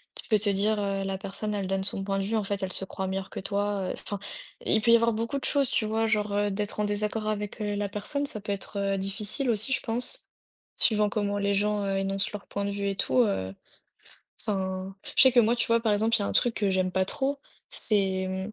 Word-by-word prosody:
Tu - - -8
peux 215 -2 +4
te 205 0 0
dire: 205 +2 +1
«Heu, 195 -1 -1
la 195 0 -2
personne, 200 +2 -3
elle 195 -2 -2
donne 195 0 -1
son 195 0 +1
point 195 0 -1
de 195 - 0
vue, 220 +3 -1
en 215 - 0
fait, 200 0 -3
elle 185 - -2
se 190 - -1
croit 190 - -4
meilleure 190 0 -3
que - - -6
toi.» 200 -1 -1
Enfin, 205 - -6 0.5
il 220 - +3
peut 235 - +1
il - - +8
y - - +8
avoir 230 0 +2
beaucoup 230 +5 -2
de - - -5
choses, 280 -3 +2
tu 215 - +1
vois, 225 +1 +1
genre, 210 -2 +1
heu, 205 0 +2
d'être 205 +1 -3
en 210 - +2
désaccord 210 +1 -1
avec, 210 +1 -3
heu, 205 -1 -1
la 205 0 -1
personne, 210 +8 0
ça 215 -7 +3
peut 205 - -4
être, 200 +1 -3 0.2
heu, - - -2
difficile 205 +7 0
aussi, 220 +4 0
je - - +1
pense. 245 - -3 0.5
Suivant 210 -2 +3
comment 205 -1 -1
les 200 0 +1
gens, 210 +1 +1
heu, 195 0 0
énoncent 195 0 -1
leur 210 -1 -7
point 200 - -3
de - - -1
vue 200 0 -2
et 195 - -2
tout, 255 - 0
heu, 95 - -1 0.9
enfin, 190 -2 -3 0.2
je - - +8
sais 260 -1 +7
que 245 - +7
moi, 235 +2 +3
tu 235 - 0
vois, 230 0 +3
par 225 -2 +2
exemple, 220 +2 +2
il - - -3
y - - +1
a - - -1
un - - -2
truc 240 -2 +3
que 205 -4 +1
j'aime 185 -1 +1
pas 190 0 +2
trop, 275 +7 -2 0.3
c'est, 210 -2 +2 0.2
hem, 190 +2 -3
205 Hz, 265 wpm, -27 LUFS, 195-220 Hz, 0.9 s, il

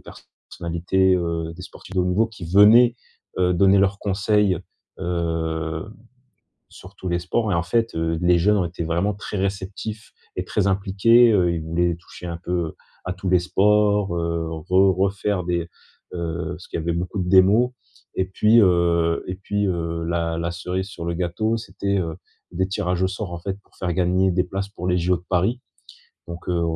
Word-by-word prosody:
personnalités, 90 +2 -2
heu, 85 -1 -2
des 90 - -10
sportifs 95 +1 -12
de 90 - +4
haut - - +1
niveau 95 +5 +2
qui 105 -6 -10
venaient, 110 +7 +6 0.4
heu, 90 -1 +3
donner 95 +2 +4
leurs 100 +1 +2
conseils, 100 -1 +1 0.4
heu, 80 +1 -2 0.8
sur 95 +2 -14
tous 95 - -7
les 85 0 0
sports. 100 +5 -1
Et - - +2
en 85 - +1
fait, 115 +7 0
heu, 80 0 -1
les 90 0 +4
jeunes 105 +4 +3
ont 90 - +1
été 85 0 -5
vraiment 85 +5 0
très 105 +1 -6
réceptifs 100 +3 -4 0.2
et - - -2
très - - -1
impliqués. 100 +5 +4
Heu, 90 -5 +3
ils 80 - -3
voulaient 85 +2 0
toucher, 85 +1 -13
un 85 -1 -4
peu, 90 -3 -2 0.3
à 90 - -2
tous 95 0 -4
les 90 - +5
sports, 105 0 +2
heu, 85 -1 -2
re 95 +4 +2
refaire 100 -1 0
des, 85 -1 -2 0.4
heu, 85 -1 -3
parce 90 0 -11
qu'il - - -4
y - - -3
avait 85 +1 -1
beaucoup 90 +4 -3
de 90 - -3
démos. 100 +6 +5 0.4
Et 95 - +1
puis, 105 +5 +4
heu 85 -4 +3
et 90 - -3
puis, 100 +1 -2
heu, 85 -2 -2
la 85 -1 -1
la 85 - -2
cerise 90 +2 -3
sur 90 -4 -8
le 85 - -1
gâteau, 90 +6 -1
c'était, 100 -3 -2
heu, 80 -3 -3 0.4
des 95 +1 -1
tirages 90 -1 -1
au 95 - +3
sort, 95 -1 -5
en 85 - -4
fait, 95 +3 -5
pour - - -30
faire 90 -2 -2
gagner 95 +1 +2
des 90 0 +1
places 95 +1 -4
pour 90 -3 -6
les 90 0 +2
JO 90 +1 +1
de 85 - -17
Paris. 100 +8 +1 0.7
Donc, 85 +1 -7
heu, 85 -1 +1
90 Hz, 195 wpm, -22 LUFS, 85-100 Hz, 0.8 s, venaient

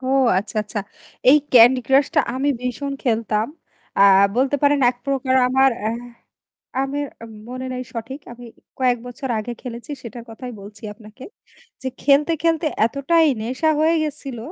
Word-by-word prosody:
ও 255 - -7 0.3
আচ্ছা, 205 +3 -6
আচ্ছা। 210 0 -5 0.5
এই 290 - +8 0.2
ক্যান্ডি 250 +1 +7
ক্রাশ 270 +1 +4
টা 300 - +5
আমি 275 +2 0
ভীষণ 265 +3 -3
খেলতাম। 225 -3 0 0.5
আ - - +3 0.4
বলতে 270 +3 +2
পারেন 285 0 +3
১ 245 - -12
প্রকার 265 -1 0
আমার 265 +1 +4
অ্যা 215 - -1 0.9
আমি 275 +1 -3 0.5
মনে 255 +1 -6
নাই 255 0 -4
সঠিক। 235 +5 -6
আমি 240 0 -11 0.3
কয়েক 250 -2 +2
বছর 255 +2 -6
আগে 215 +3 -4
খেলেছি 240 +2 -8
সেটার 235 0 -9
কথাই 245 +2 -8
বলছি 205 +1 -13
আপনাকে। 215 +4 -14 0.6
যে 260 - -2
খেলতে, 295 +3 +4
খেলতে 330 -1 +1 0.2
এতটাই 310 +6 +2 0.2
নেশা 260 +7 0
হয়ে 325 +2 +3
গেছিল 275 -4 -5
260 Hz, 155 wpm, -21 LUFS, 235-280 Hz, 0.9 s, এই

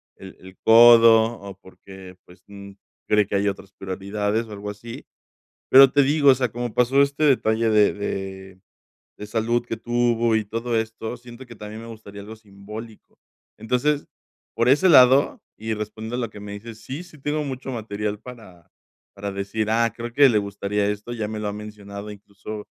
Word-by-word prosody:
el 95 -1 -12
el 95 0 -15
codo 115 0 +8 0.2
o 100 -1 -9
porque, 95 -1 -14
pues, 90 +1 -19
mm, 100 0 -11 0.4
cree 105 -1 +3
que 100 - -3
hay 100 +1 +1
otras 100 -1 -5
prioridades 105 +3 -3
o - - -13
algo 105 0 -7
así, 105 +3 -9 0.6
pero 135 0 +8
te 145 - +4
digo, 145 +1 +3
o 135 - +7
sea, 125 -1 -1
como 120 -1 -5
pasó 125 +3 +3
este 140 +2 0
detalle 115 -5 +2
de 105 -1 +4
de 95 -2 -6 0.6
de 105 - -7
salud 115 +2 -1
que 115 - -4
tuvo 120 0 +1
y 110 - -1
todo 115 +3 -2
esto, 110 +1 -6
siento 120 +1 -13
que 120 -1 -13
también 105 +1 -9
me 115 - -10
gustaría 105 -3 -11
algo 110 +2 -10
simbólico. 105 +1 -12 0.4
Entonces, 125 +7 0 0.5
por 115 +1 +1
ese 150 +8 +4
lado, 130 -3 +5
y 110 +1 -4
respondo 110 +2 -6
a - - -4
lo 120 -3 -3
que 105 - -12
me 100 0 -8
dices, 110 +2 -10
sí, 140 +6 -6
sí 175 -4 -16
tengo 150 +2 -2
mucho 130 -1 -6
material 105 -2 -4
para 110 -9 -13 0.5
para 100 0 -5
decir: 100 +2 -3
"Ah, 115 0 +2
creo 120 0 -6
que 140 +3 +6
le 110 - +2
gustaría 100 0 -2
esto", 105 +3 -4
ya 110 -3 -4
me 110 0 -5
lo 105 - -4
ha - - -3
mencionado, 105 -1 -9
incluso, 105 +1 -9
110 Hz, 185 wpm, -23 LUFS, 100-120 Hz, 0.6 s, codo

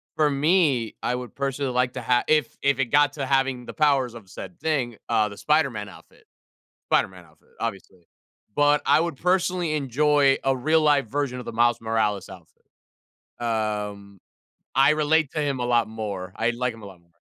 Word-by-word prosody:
For 150 -1 +3
me, 140 - +2
I 125 - -1
would 125 -1 -7
personally 135 -1 -2
like 125 0 0
to 125 - -5
ha 120 +1 +2
if 150 -5 +1
if 140 -1 +2
it 135 - +2
got 145 +2 +3
to 140 -3 -4
having 135 -2 0
the - - -8
powers 140 -6 +2
of 105 -6 -12
said 90 0 -10
thing, 130 -8 -1
uh, 110 -2 +2
the 100 - -11
Spider-Man 135 -10 0
outfit. - - -18 0.6
Spider-Man 90 -2 0
outfit, 75 -1 -26
obviously. 95 -5 -6 0.5
But 145 0 +3
I - - +5
would 170 -4 -2
personally 180 -2 0
enjoy 140 0 +2
a 135 -1 +2
real-life 150 -1 +2
version 135 0 -2
of - - -9
the - - -6
Miles 120 +1 +2
Morales 110 -3 -1
outfit. 90 -3 -15 0.8
Um, 105 -4 -3 0.6
I 135 +2 +5
relate 155 -1 +2
to 155 - -2
him 140 -3 -1
a - - -1
lot 120 -2 +2
more. 100 -4 -5
I 115 +2 +1
like 120 0 -2
him 115 - -13
a - - -9
lot 95 -3 -13
more. 85 0 -32
125 Hz, 185 wpm, -24 LUFS, 110-145 Hz, 0.8 s, I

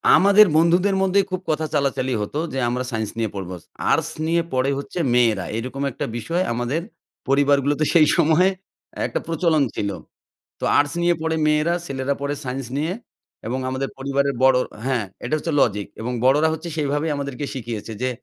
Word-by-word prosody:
আমাদের 200 +2 +7
বন্ধুদের 175 +4 +3
মধ্যেই 195 +1 +3
খুব 185 - -1
কথা 155 0 0
চালাচালি 135 -3 0
হতো 105 +8 -3
যে 135 - -1
আমরা 125 +1 -1
সায়েন্স 110 -2 -2
নিয়ে 115 -1 0
পড়বো। 95 -2 -5 0.4
আর্টস - - +2 0.2
নিয়ে 170 +1 +2
পড়ে 130 +1 +1
হচ্ছে 140 +5 -5
মেয়েরা। 115 -6 +3
এরকম 130 +4 -5
একটা - - -4
বিষয় 165 +10 -1
আমাদের 120 +7 -1 0.5
পরিবারগুলোতে 140 +1 +3
সেই 160 -3 +6
সময়ে 165 +5 +4 0.6
একটা - - -2
প্রচলন 165 -2 +2
ছিল। 100 - -1 0.7
তো - - -3
আর্টস 145 +3 +2
নিয়ে 175 0 +3
পড়ে 160 0 0
মেয়েরা 150 +3 +2
ছেলেরা 135 +1 -2
পড়ে 140 0 -2
সায়েন্স 130 0 -4
নিয়ে 155 +5 -1 0.5
এবং 125 +3 -2
আমাদের 130 +1 -2
পরিবারের 140 +1 0
বড়ো 130 -1 +5 0.3
হ্যাঁ, 125 -5 0 0.2
এটা - - -1
হচ্ছে 165 +2 -3
লজিক 105 -5 +1
এবং 120 +3 -3
বড়োরা 145 +5 +4
হচ্ছে 160 +2 -5
সেইভাবেই 145 +1 0
আমাদেরকে 140 -1 -4
শিখিয়েছে 115 -3 -5
যে, 130 - +1
140 Hz, 170 wpm, -22 LUFS, 125-160 Hz, 0.7 s, আমাদের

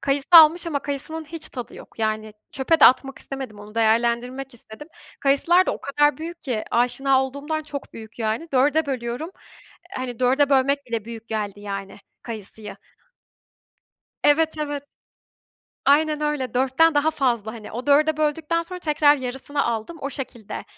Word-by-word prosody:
Kayısı 275 0 0
almış 330 +1 +8
ama 305 -4 -1
kayısının 290 +3 -4
hiç 320 +1 -6
tadı 245 -3 -8
yok. - - -14
Yani 215 -1 -2 0.2
çöpe 295 +4 +1
de - - +9
atmak 270 +2 +4
istemedim, 265 -6 -7
onu 210 +1 -12
değerlendirmek 235 +4 0
istedim. 235 +6 -12 0.3
Kayısılar 335 +7 +3
da - - +1
o - - -10
kadar 295 +1 +2
büyük 335 +1 -7
ki 235 -6 -2
aşina 260 +3 +2
olduğumdan 285 +4 -4
çok 295 -2 -8
büyük 220 +1 -12
yani 225 +8 -2
4'e 290 +4 +3
bölüyorum. 255 +4 -4 0.7
Hani 250 -2 -5
4'e 270 +3 +3
bölmek 275 +1 +2
bile 230 -3 -3
büyük 230 0 -9
geldi 205 -2 -4
yani 195 -1 -6 0.2
kayısıyı. 215 -2 -8 1.5
Evet, 315 +2 +4
evet. 290 -2 -3 1.0
Aynen 300 +1 +3
öyle, 295 -4 -2
4'ten 270 +6 +3
daha 290 +2 +3
fazla 240 -8 -1
hani 225 -2 -10
o 245 +4 -6
4'e 300 +2 +4
böldükten 310 +2 0
sonra 360 +2 -8
tekrar 300 -3 +3
yarısını 265 +2 -3
aldım. 235 +8 -3
O 275 - -4
şekilde, 245 -6 -7
270 Hz, 155 wpm, -23 LUFS, 235-300 Hz, 1.5 s, de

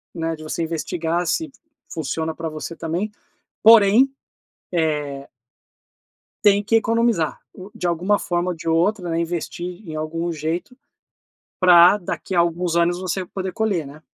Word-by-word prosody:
né, 165 -1 -2
de 155 - -11
você 160 +2 -3
investigar 165 +1 -2
se 315 - -1 0.4
funciona 160 +1 -3
pra 165 0 -5
você 155 +2 -6
também. 170 +7 -3 0.5
Porém, 225 +4 +7 0.6
é" 150 -4 -1 1.2
"tem 205 0 +5
que 225 +3 0
economizar, 230 -7 +1
o 190 +2 -11
de 185 -5 -3
alguma 180 +5 +1
forma 175 +1 -1
ou 175 - -4
de 160 - -11
outra, 175 +2 +1
né, 165 +1 0
investir 175 +3 -5
em 155 - -7
algum 165 +2 -3
jeito, 160 - -4 0.9
pra 180 +1 +7
daqui 185 0 -5
a - - +4
alguns 170 0 0
anos 170 +1 +2
você 185 0 -3
poder 190 +1 -5
colher, 200 -9 -1
né". 150 +2 -13
175 Hz, 150 wpm, -22 LUFS, 160-195 Hz, 1.2 s, Porém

